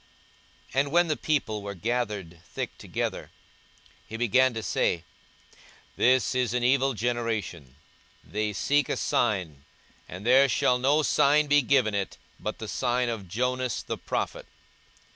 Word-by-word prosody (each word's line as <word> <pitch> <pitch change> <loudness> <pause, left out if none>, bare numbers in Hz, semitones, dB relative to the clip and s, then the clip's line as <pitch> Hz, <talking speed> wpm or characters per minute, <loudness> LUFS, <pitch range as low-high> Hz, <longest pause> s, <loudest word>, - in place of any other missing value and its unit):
42:011:029 135 - +2
And 140 0 0
when 175 +2 +4
the 155 - +1
people 140 -10 -1
were 100 0 -6
gathered 105 -5 -3
thick - - -6
together, - - -4 0.8
he 110 +1 -6
began 125 +3 +3
to 110 - -4
say, 85 - 0 0.9
This 130 -2 +3
is 125 -2 0
an 125 - 0
evil 135 +1 +2
generation: 110 - -3 0.5
they 105 0 -2
seek 145 +7 +1
a - - -1
sign; 90 - -1 0.5
and 90 +4 -8
there 135 +3 +6
shall 125 +1 +2
no 145 +4 +3
sign 150 +1 +4
be 145 0 +4
given 125 -5 +2
it, 100 -1 -3 0.2
but - - -4
the 110 - -7
sign 125 +1 0
of 110 -5 -5
Jonas 125 +3 -1
the - - -4
prophet. - - -3
120 Hz, 145 wpm, -27 LUFS, 105-130 Hz, 0.9 s, there